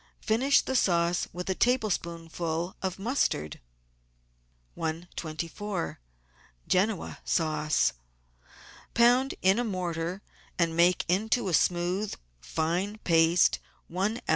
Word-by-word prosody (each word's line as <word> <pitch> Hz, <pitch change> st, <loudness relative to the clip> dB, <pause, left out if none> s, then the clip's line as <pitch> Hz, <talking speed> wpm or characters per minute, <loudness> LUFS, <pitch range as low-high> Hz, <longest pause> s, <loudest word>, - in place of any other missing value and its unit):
Finish 260 Hz, +6 st, +3 dB
the 265 Hz, -, -3 dB
sauce 170 Hz, -5 st, +2 dB
with 180 Hz, +1 st, -6 dB
a 190 Hz, -, +1 dB
tablespoonful 170 Hz, -7 st, -1 dB
of 190 Hz, -1 st, -2 dB
mustard. 195 Hz, -, -1 dB, 1.2 s
i24~QEN0A 160 Hz, -, -4 dB
SAUCE 155 Hz, -, +1 dB, 1.0 s
Pound 245 Hz, +3 st, +4 dB
in 190 Hz, +4 st, +4 dB
a -, -, +1 dB
mortar, 180 Hz, -3 st, -3 dB, 0.3 s
and 165 Hz, -2 st, +1 dB
make 175 Hz, +2 st, +4 dB
into 205 Hz, +4 st, +1 dB
a -, -, -2 dB
smooth, 180 Hz, +5 st, +1 dB, 0.2 s
fine 175 Hz, -, -2 dB
paste, 165 Hz, +1 st, +4 dB, 0.3 s
one 195 Hz, +6 st, -1 dB
oz. -, -, -12 dB
175 Hz, 95 wpm, -28 LUFS, 165-205 Hz, 1.2 s, Pound